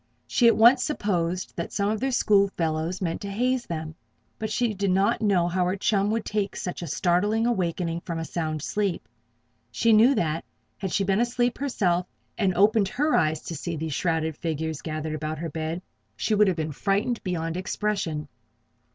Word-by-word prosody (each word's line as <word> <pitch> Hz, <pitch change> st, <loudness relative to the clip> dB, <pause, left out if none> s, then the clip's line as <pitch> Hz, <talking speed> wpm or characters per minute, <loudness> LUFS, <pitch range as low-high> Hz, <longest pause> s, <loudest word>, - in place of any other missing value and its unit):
She 240 Hz, -, +3 dB
at 230 Hz, -, +5 dB
once 240 Hz, +3 st, +7 dB
supposed 185 Hz, -, -1 dB
that 170 Hz, -, -4 dB
some 200 Hz, 0 st, 0 dB
of 215 Hz, -, -1 dB
their 270 Hz, -, 0 dB
school 205 Hz, -5 st, +4 dB
fellows 165 Hz, +3 st, -1 dB
meant 165 Hz, -2 st, -2 dB
to 200 Hz, -, -5 dB
haze 245 Hz, +4 st, 0 dB
them; 160 Hz, -1 st, -4 dB, 0.5 s
but 220 Hz, -, -2 dB
she 230 Hz, 0 st, +1 dB
did 200 Hz, 0 st, -1 dB
not 195 Hz, +6 st, +2 dB
know 190 Hz, -5 st, +3 dB
how 180 Hz, +1 st, 0 dB
her 180 Hz, +2 st, 0 dB
chum 200 Hz, 0 st, +1 dB
would 225 Hz, 0 st, -1 dB
take 205 Hz, -2 st, -2 dB
such 180 Hz, -, -4 dB
a 170 Hz, -, -5 dB
startling 200 Hz, +8 st, +1 dB
awakening 170 Hz, -6 st, -1 dB
from 165 Hz, -1 st, -4 dB
sound 155 Hz, -2 st, -3 dB
sleep. 200 Hz, -4 st, -2 dB, 0.6 s
She 230 Hz, -1 st, +2 dB
knew 235 Hz, +6 st, +6 dB
that, 165 Hz, -6 st, 0 dB, 0.4 s
had 190 Hz, -3 st, -3 dB
she 200 Hz, -, +1 dB
been 195 Hz, +1 st, +1 dB
asleep 240 Hz, 0 st, 0 dB
herself 180 Hz, -10 st, 0 dB, 0.3 s
and 190 Hz, -4 st, +1 dB
opened 205 Hz, +1 st, +4 dB
her 295 Hz, +9 st, 0 dB
eyes 155 Hz, 0 st, +2 dB
to 165 Hz, -, -5 dB
see 170 Hz, +3 st, -4 dB
these 160 Hz, -1 st, -3 dB
shrouded 160 Hz, -1 st, 0 dB
figures 160 Hz, -1 st, -3 dB
gathered 155 Hz, -1 st, -4 dB
about 155 Hz, 0 st, -3 dB
her 165 Hz, 0 st, -5 dB
bed, 160 Hz, +3 st, -4 dB, 0.3 s
she 220 Hz, -, -1 dB
would 210 Hz, 0 st, +5 dB
have 185 Hz, -3 st, +1 dB
been 155 Hz, -1 st, -2 dB
frightened 205 Hz, -, 0 dB
beyond 165 Hz, -3 st, -2 dB
expression. 185 Hz, -5 st, -2 dB
185 Hz, 185 wpm, -26 LUFS, 165-215 Hz, 0.6 s, once